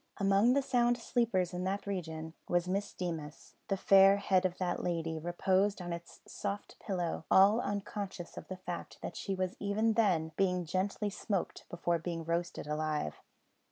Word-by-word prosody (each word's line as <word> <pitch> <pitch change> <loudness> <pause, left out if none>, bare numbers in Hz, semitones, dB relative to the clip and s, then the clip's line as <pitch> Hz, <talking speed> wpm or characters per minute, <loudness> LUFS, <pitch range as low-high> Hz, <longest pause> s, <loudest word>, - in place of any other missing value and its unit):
Among 200 +4 +4
the 280 +1 +2
sound 240 -2 +3
sleepers 220 -7 0
in 180 0 -3
that 195 +2 -2
region 160 -5 -4 0.2
was 175 0 +2
Miss 200 +2 -1
Deemas. 160 -4 -5
The 195 - 0
fair 195 +1 +7
head 190 -2 +2
of 180 - -10
that 180 -1 -1
lady 165 -2 -2
reposed 190 +4 +1
on 175 -1 -4
its 170 0 -9
soft 200 +1 -5
pillow 175 -5 -2
all 200 +4 +6
unconscious 200 -3 -4
of - - -8
the 185 - -6
fact 180 -2 -6
that - - -5
she 195 - -3
was 185 -1 -2
even 215 +2 +1
then 180 -8 +2
being 180 -2 +1
gently 195 +4 -1
smoked 195 -2 -3
before 175 0 0
being 165 0 -4
roasted 170 0 -2
alive. 150 - -2
185 Hz, 165 wpm, -33 LUFS, 170-200 Hz, 0.2 s, fair